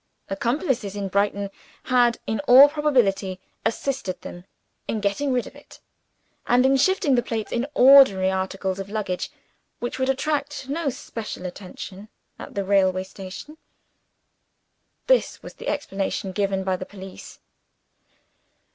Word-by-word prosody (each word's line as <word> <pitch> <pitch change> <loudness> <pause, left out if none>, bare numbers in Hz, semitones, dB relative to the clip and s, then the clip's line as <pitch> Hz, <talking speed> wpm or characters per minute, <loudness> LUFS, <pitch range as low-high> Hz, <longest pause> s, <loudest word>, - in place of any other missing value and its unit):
Accomplices 235 - -1
in 200 -1 -3
Brighton 200 0 0 0.3
had, 245 -2 +3
in 220 -1 -2
all 260 +4 +10
probability, 235 -11 +1 0.2
assisted 225 -4 -2
them 175 +1 -9 0.4
in 220 - -1
getting 210 +8 0
rid 250 -2 0
of - - -12
it, - - -16 0.7
and 250 +1 +4
in 270 +1 +4
shifting 345 -1 +2
the 245 - +4
plates 225 -2 -4
into 245 +4 -1
ordinary 250 -8 +7
articles 190 0 -2
of 195 0 -6
luggage, 205 -4 -3 0.5
which 240 +2 -5
would 260 0 +1
attract 285 0 -1
no 295 +1 -1
special 225 -6 -7
attention 190 +2 -8 0.3
at - - -10
the 200 - -1
railway 190 -1 +2
station. 190 +11 -10 1.5
This - - +2
was - - -9
the - - -10
explanation 195 0 -2
given 195 -1 -1
by 190 -1 0
the 185 - -6
police. 190 -2 -11
210 Hz, 135 wpm, -24 LUFS, 190-265 Hz, 1.5 s, all